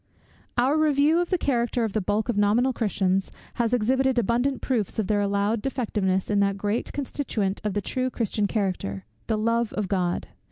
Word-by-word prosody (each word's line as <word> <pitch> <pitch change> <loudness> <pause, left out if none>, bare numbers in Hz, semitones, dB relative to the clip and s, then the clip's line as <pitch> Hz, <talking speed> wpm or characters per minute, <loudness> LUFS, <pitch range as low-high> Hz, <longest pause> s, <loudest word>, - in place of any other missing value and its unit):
Our 260 +5 +3
review 305 +1 +3
of 350 - -1
the 365 - +2
character 240 -5 0
of 220 -3 -2
the 215 - 0
bulk 205 +3 0
of 240 - 0
nominal 215 +6 +3
Christians 195 -4 0 0.3
has 230 -1 +1
exhibited 255 +2 +2
abundant 240 +4 +1
proofs 230 -7 -1
of 220 - +1
their 205 +1 +1
allowed 200 +2 0
defectiveness 205 -8 -1
in 205 - +3
that 200 0 +2
great 205 +3 -2
constituent 235 -8 -2
of 210 -2 -2
the 205 - +1
true 255 +5 -1
Christian 215 -4 -1
character, 185 - -2 0.2
the 220 - +1
love 230 +1 +1
of 210 -2 -2
God. 180 -2 -1
220 Hz, 185 wpm, -25 LUFS, 200-250 Hz, 0.3 s, Our